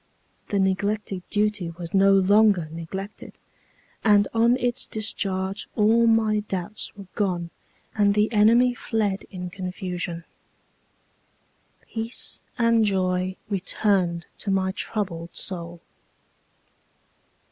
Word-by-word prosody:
The 200 - 0
neglected 195 0 0
duty 210 -4 0
was 170 0 -7
no 195 0 +5
longer 195 -2 +4
neglected, 190 +5 -7 0.7
and 205 -2 +5
on 235 +2 +4
its 245 0 -1
discharge 195 -2 -2
all 225 +2 +4
my 220 -2 +3
doubts 205 0 -4
were 200 -1 -10
gone, 175 -5 -1 0.4
and 205 -1 +3
the 210 +1 +2
enemy 230 +4 +5
fled 215 -4 -2
in 180 -1 -6
confusion. 180 -2 -5 1.6
Peace 225 +1 -1 0.2
and 230 -2 +3
joy 185 -2 0
returned 185 -3 0
to 205 - -5
my 190 -1 +1
troubled 185 -5 -4
soul. 170 -2 -2
200 Hz, 105 wpm, -24 LUFS, 185-215 Hz, 1.6 s, no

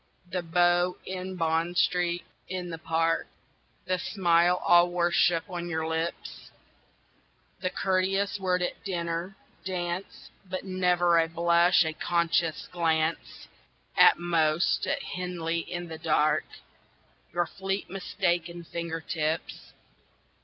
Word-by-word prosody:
The 180 0 -1
bow 175 +1 +2
in 185 0 -5
Bond 165 +1 0
Street 175 -1 +1 0.3
in 180 -2 -4
the 165 - -6
Park 165 0 0 0.6
The 185 0 0
smile 175 -2 +2
all 175 0 +6
worship 175 -1 +2
on 175 -1 -5
your 160 -1 -2
lips, 160 +1 -4 1.1
The 185 - -1
courteous 195 +2 0
word 180 -1 +1
at - - -4
dinner 170 0 -3 0.3
dance 180 0 -4
But 185 -1 -5
never 180 -2 +2
a 165 - +2
blush 170 +1 +4
a 160 - -2
conscious 170 -1 0
glance; 160 -2 -1 0.5
At - - +7
most, 165 -1 +1
at 280 0 -1
Henley, 175 -2 -3
in 175 +1 -5
the 160 -1 -8
dark, 155 -2 +2 0.9
Your 175 0 +1
fleet 195 +2 -4
mistaken 175 -3 -2
finger 170 0 -5
tips? 160 0 -3
175 Hz, 115 wpm, -28 LUFS, 165-180 Hz, 1.1 s, At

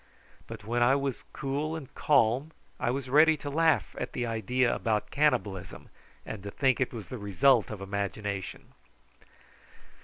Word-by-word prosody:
But 115 -2 -9
when 120 +2 -1
I 125 +3 +5
was 140 -2 -3
cool 145 +4 -3
and 145 -5 -8
calm 140 +2 +2 0.3
I - - 0
was 130 +1 -2
ready 155 +4 +5
to 145 0 -6
laugh 160 +2 +2
at - - -4
the 120 - -2
idea 115 +2 +1
about 110 -2 -1
cannibalism, 105 - -1 0.4
and 110 - -6
to 100 - -6
think 130 +4 +1
it 130 - +1
was 110 -5 -7
the 125 - -6
result 110 +4 +3
of 105 -2 -7
imagination. 100 0 -4
120 Hz, 155 wpm, -29 LUFS, 105-140 Hz, 0.4 s, I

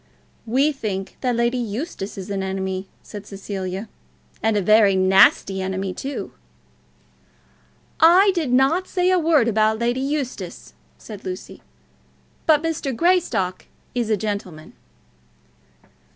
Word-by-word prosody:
"We 270 +6 +2
think 200 -8 -5
that 250 -2 0
Lady 235 +2 +1
Eustace 225 - -5
is 195 +1 -6
an 195 -1 -2
enemy," 190 0 -3 0.2
said 205 -1 -10
Cecilia, 195 0 -5 0.5
"and 220 -1 +1
a - - +2
very 215 0 +5
nasty 190 0 +4
enemy, 190 0 -3
too." 275 +9 -5 1.7
"I 365 +5 +6
did 320 -8 -1
not 275 +9 +3
say 365 -1 +1
a 370 - +3
word 310 -7 +3
about 220 0 +2
Lady 240 +3 -1
Eustace," 275 -2 -4 0.2
said 210 -3 -10
Lucy. 185 0 -7 0.9
"But 310 -1 +4
Mr. 315 -5 -2
Greystock 335 - +1 0.3
is 240 -3 -1
a 215 - +2
gentleman." 200 -6 -5
220 Hz, 125 wpm, -22 LUFS, 195-280 Hz, 1.7 s, I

